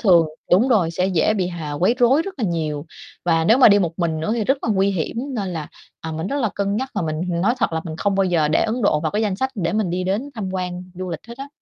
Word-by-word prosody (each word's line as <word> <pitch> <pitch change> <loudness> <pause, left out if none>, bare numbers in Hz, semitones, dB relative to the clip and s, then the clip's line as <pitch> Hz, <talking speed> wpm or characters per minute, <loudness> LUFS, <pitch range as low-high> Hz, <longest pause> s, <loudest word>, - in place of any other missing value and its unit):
thường 175 -7 +5 0.2
đúng 210 +9 +5
rồi, 190 -9 +3
sẽ 180 +2 0
dễ 190 +3 +2
bị 185 -3 0
h 170 -2 -7
à, 150 - -4
quấy 180 +10 +2
rối 260 +6 +4
rất 390 +2 -7
là 235 - 0
nhiều, 155 -4 -2 0.4
và 165 -2 +2
nếu 225 +9 +5
mà 255 - +8
đi 205 0 +6
một 170 -4 0
mình 160 -2 -1
nữa 160 - -2
thì 225 - -1
rất 270 +5 +2
là - - -2
nguy 195 0 +2
hiểm. 180 +2 -3 0.2
Nên 200 -4 -2
là, 160 -4 -5 0.3
à, 160 0 -5
mình 160 +3 -3
rất 280 - -2
là 225 - +1
cân 200 +1 -1
nhắc, 260 +2 -3
và 205 - -1
mình 155 -1 -2 0.2
nói 230 +6 +2
thật 235 - 0
là 160 - -1
mình 160 -1 -6
không 200 +2 0
bao 195 0 +2
giờ 170 -5 +2
để 155 - +2
Ấn 230 +2 -1
Độ 150 -6 +3
vào 155 0 -1
cái 210 +2 0
danh 205 -3 0
sách 265 +5 -1
để 170 -5 -1
mình 210 -5 0
đi 180 +1 -2
đến 210 +10 -2
tham 205 -4 -4
quan 180 -1 -3
du 185 0 -5
lịch 160 - -4
hết 235 - -9
á. 275 +1 -6
185 Hz, 305 wpm, -21 LUFS, 165-220 Hz, 0.4 s, mà